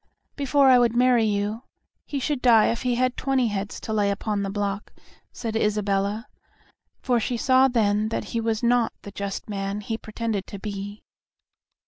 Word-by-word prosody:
"Before 280 0 +3
I 255 -1 +7
would 235 -1 +2
marry 245 -2 +4
you, 210 +2 -1 0.5
he 285 - -3
should 275 0 -2
die 230 -4 +5
if 230 - -3
he 250 -1 0
had 255 +1 +1
twenty 260 -3 +1
heads 200 0 -4
to 220 - -4
lay 205 -2 +2
upon 200 +1 -2
the 195 - -2
block," 200 0 -3 0.4
said 225 -2 -5
Isabella, 210 0 0 0.8
for 245 -2 +2
she 240 +2 -2
saw 260 +2 +4
then 215 -3 +1
that - - -2
he 230 - 0
was 225 0 -1
not 240 -1 +2
the 200 - -8
just 200 0 -5
man 200 -1 -3
he 220 +2 -4
pretended 215 -3 -3
to 200 - -7
be. 205 0 -6
220 Hz, 175 wpm, -24 LUFS, 205-245 Hz, 0.8 s, I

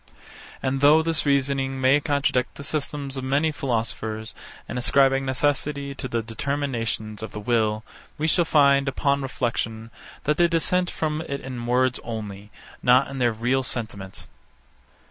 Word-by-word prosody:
And 135 0 0
though 150 +3 +6
this 160 -2 +1
reasoning 135 -1 +1
may 130 +2 +4
contradict 140 -3 0
the 140 - -8
systems 140 -2 -3
of 130 - -4
many 140 +4 +1
philosophers, 110 -5 -3 0.3
in 125 - -3
ascribing 135 +1 +3
necessity 140 +1 0
to 130 - -6
the 115 -2 -2
determinations 115 -3 -3
of 110 - -7
the - - -5
will, 110 -1 +1 0.3
we 155 - -1
shall 170 +2 +3
find, 140 -3 +4
upon 140 +1 +1
reflection, 115 -3 -3 0.3
that 150 +1 +1
they 175 - +5
dissent 175 +2 +1
from 155 0 -2
it 140 - -2
in 125 -2 -6
words 125 +1 +2
only, 105 -3 -6 0.3
not 125 +2 +4
in 135 - -5
their 120 -1 +3
real 120 +4 0
sentiment. 110 -6 -5
135 Hz, 150 wpm, -24 LUFS, 115-140 Hz, 0.3 s, though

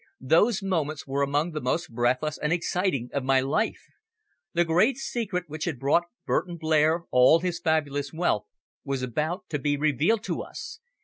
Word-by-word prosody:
Those 190 - +3
moments 155 -6 -1
were 140 +1 -2
among 145 +4 +1
the 155 -1 -4
most 160 +5 -1
breathless 125 +5 0
and 150 - -1
exciting 170 -6 0
of 140 - -1
my 135 0 +3
life. 140 +12 -1 0.7
The 175 0 +3
great 185 +11 +3
secret 220 -9 -3
which 155 +1 -5
had 160 -6 -2
brought 145 +7 +2 0.2
Burton 175 -1 -1
Blair 160 +1 +2
all 125 +6 +6
his 175 -1 -2
fabulous 145 -3 0
wealth 165 -10 0 0.4
was 135 -2 -3
about 155 - -2
to 150 - -2
be 145 +1 0
revealed 155 - +1
to - - -3
us. - - -8
155 Hz, 170 wpm, -26 LUFS, 140-175 Hz, 0.7 s, all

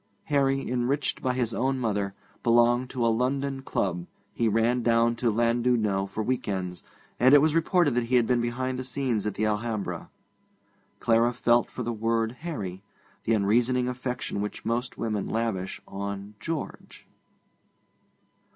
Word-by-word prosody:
Harry, 135 -1 +2
enriched 125 +4 0
by 130 - +1
his 125 -3 -1
own 135 +2 0
mother, 100 -5 -1 0.3
belonged 120 +2 +3
to 125 -3 -1
a - - +4
London 135 +2 -1
club; 90 -8 -2 0.3
he 115 - +1
ran 115 +3 +2
down 115 0 +3
to 115 0 +1
Llandudno 115 -3 +1
for 110 +2 -3
week 130 +3 -1
ends; 90 -3 -3 0.4
and 130 +4 +7
it - - +10
was 155 +1 +3
reported 165 -2 +3
that 120 0 +1
he 125 +2 +1
had 120 -2 +5
been 120 0 +2
behind 130 +2 -2
the - - -3
scenes 125 -5 -1
at 105 - -3
the 110 - 0
Alhambra. 110 -1 -2 0.9
Clara 115 +1 +3
felt 120 0 +2
for 125 - -5
the 120 +1 -2
word 115 0 0
'Harry' 100 - -5 0.4
the 115 - +3
unreasoning 120 +5 +2
affection 125 -4 -3
which 105 - -5
most 120 +2 -1
women 110 -3 -2
lavish 110 -5 -2
on 100 +1 -5
'George.' 160 +6 -5
120 Hz, 155 wpm, -27 LUFS, 110-125 Hz, 0.9 s, it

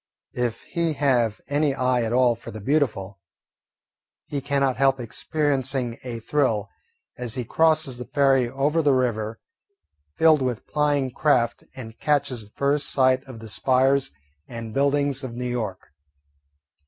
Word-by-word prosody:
If 120 -2 -2
he 170 -2 -1
have 125 -7 +1
any 145 0 +1
eye 125 -1 +1
at 115 -1 -2
all 125 0 +4
for 115 - -10
the 110 - -7
beautiful, 105 - -1 1.1
he 140 -2 -4
cannot 140 -2 0
help 135 0 +3
experiencing 130 0 -1
a 120 -2 -5
thrill 110 -6 0 0.5
as 120 -2 -3
he 125 -2 -3
crosses 155 -3 +2
the 125 - -7
ferry 135 -3 +3
over 140 +5 +1
the 145 -3 +3
river 115 -3 -1 0.8
filled 160 -3 +5
with 125 -3 -2
plying 145 -3 0
craft 120 -4 +1
and 115 -3 -10
catches 135 -6 0
the 105 - -17
first 140 +5 0
sight 130 -1 +3
of 130 -3 -10
the 110 - -9
spires 130 - +2 0.4
and 115 -2 -7
buildings 140 0 +1
of 120 -3 -6
New 125 +1 -4
York. 110 -9 -4
130 Hz, 145 wpm, -24 LUFS, 120-140 Hz, 1.1 s, filled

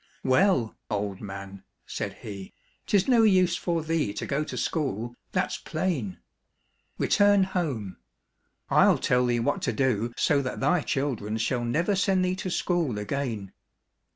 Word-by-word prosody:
" - - -34
Well, 130 - +3
old 100 -2 -2
man,'* 100 -1 -8 0.2
said - - -4
he, 100 -3 -8 0.2
" - - -41
'tis 195 -2 +3
no 245 -3 +5
use 185 -5 +4
for 170 -2 -1
thee 160 -9 0
to - - -4
go 145 +2 -1
to - - -6
school, 120 -6 -2 0.2
that's - - -1
plain. 130 - -2 0.8
Return 205 -1 +4
home. 145 - -3 0.7
I'll - - +5
tell 125 0 +2
thee 120 -1 +1
what 140 +5 0
to - - 0
do 120 -4 0
so 145 -3 +3
that 130 -2 -4
thy 180 -2 +2
children 120 -8 -2
shall 120 +2 0
never 165 +12 +1
send 190 -1 +2
thee 180 0 0
to 185 - -4
school 170 - 0
again. 105 -2 -3
135 Hz, 155 wpm, -27 LUFS, 110-180 Hz, 0.8 s, no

